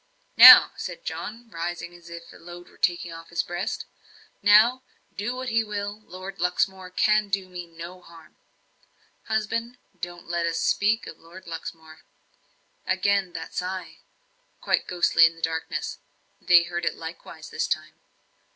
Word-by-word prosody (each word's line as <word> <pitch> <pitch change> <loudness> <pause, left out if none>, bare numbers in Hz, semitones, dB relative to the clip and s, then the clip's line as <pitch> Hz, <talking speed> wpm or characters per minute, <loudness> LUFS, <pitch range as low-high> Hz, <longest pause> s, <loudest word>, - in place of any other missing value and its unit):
"Now," - - +11
said - - -7
John, 235 - -6
rising, 170 +1 -5
as 170 -1 -15
if 170 0 -10
a - - -14
load 175 +1 -12
were - - -21
taken 175 -1 0
off 165 0 -11
his 170 - -1
breast 175 +7 -4 0.6
"now, 215 +5 +5 0.3
do 210 +5 -3
what 255 0 -4
he 225 -1 +2
will 205 0 -5
Lord 185 +2 -9
Luxmore 185 +1 -1
cannot 210 +2 +2
do 195 -1 -1
me 175 -2 -9
any 165 0 -10 0.2
harm." 165 -2 -17 0.9
"Husband, 230 +2 -2 0.2
don't 175 0 -7
let 170 0 -1
us 165 -1 -2
speak 215 +7 +1
of - - -10
Lord 170 +3 -14
Luxmore." 160 -1 -9 0.9
Again 200 -3 +1
that - - -7
sigh 185 -1 -5 0.6
quite - - 0
ghostly 175 -2 +4
in 165 - -6
the 165 - -16
darkness. 160 0 -3 0.4
They 175 -1 +6
heard 175 0 -5
it - - -1
likewise 165 +1 -10
this - - -2
time. - - -3
180 Hz, 150 wpm, -25 LUFS, 170-205 Hz, 0.9 s, Now